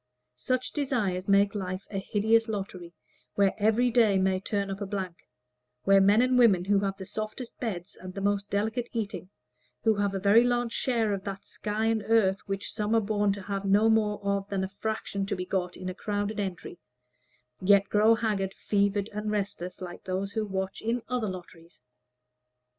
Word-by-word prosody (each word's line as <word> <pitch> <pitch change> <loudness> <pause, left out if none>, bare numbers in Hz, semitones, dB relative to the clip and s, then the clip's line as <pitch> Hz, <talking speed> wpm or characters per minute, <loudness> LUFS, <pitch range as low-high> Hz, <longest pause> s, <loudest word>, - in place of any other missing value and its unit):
Such 255 - -1
desires 210 -11 -1
make 200 0 +4
life 185 -2 -4
a 195 - -2
hideous 220 +3 +2
lottery, 190 -5 -5 0.4
where 200 -1 +3
every 220 +4 +3
day 225 -5 +4
may 190 0 +2
turn 200 0 -2
up 195 +1 -6
a 200 - -3
blank; 190 -3 -5 0.6
where 195 0 +5
men 205 +5 +5
and 255 0 +3
women 195 -7 +5
who 200 0 +3
have 195 -1 -2
the 190 - -7
softest 215 +5 -6
beds 190 -7 -4
and 185 0 -9
the - - -3
most 200 0 0
delicate 220 +4 -1
eating, 205 -5 -4 0.5
who 225 - +4
have 200 -1 -1
a - - -1
very 205 +5 +6
large 245 -1 +1
share 230 -4 +1
of 195 -1 -4
that 195 -1 -6
sky 215 +1 -3
and 225 -1 +2
earth 205 -4 +3
which 195 0 -4
some 210 +1 0
are - - +5
born 205 -1 +1
to 200 -1 -7
have 195 0 -3
no 205 +3 +4
more 210 -2 +2
of 200 0 -1
than 195 -1 -1
the 190 - -2
fraction 200 -1 -3
to - - -1
be 180 -1 -4
got 180 -1 -2
in 185 - -6
a 185 - -3
crowded 205 +2 -3
entry, 180 -4 -5 0.8
yet 200 +1 +5
grow 215 +3 +4
haggard, 205 -4 -1
fevered, 200 0 0
and 210 +1 -3
restless, 200 -4 -3
like 175 -1 -8
those 190 +1 -2
who 215 +1 -2
watch 190 -1 -3
in 230 +2 -1
other 250 -3 -1
lotteries. 175 -4 -10
200 Hz, 190 wpm, -28 LUFS, 195-220 Hz, 0.8 s, very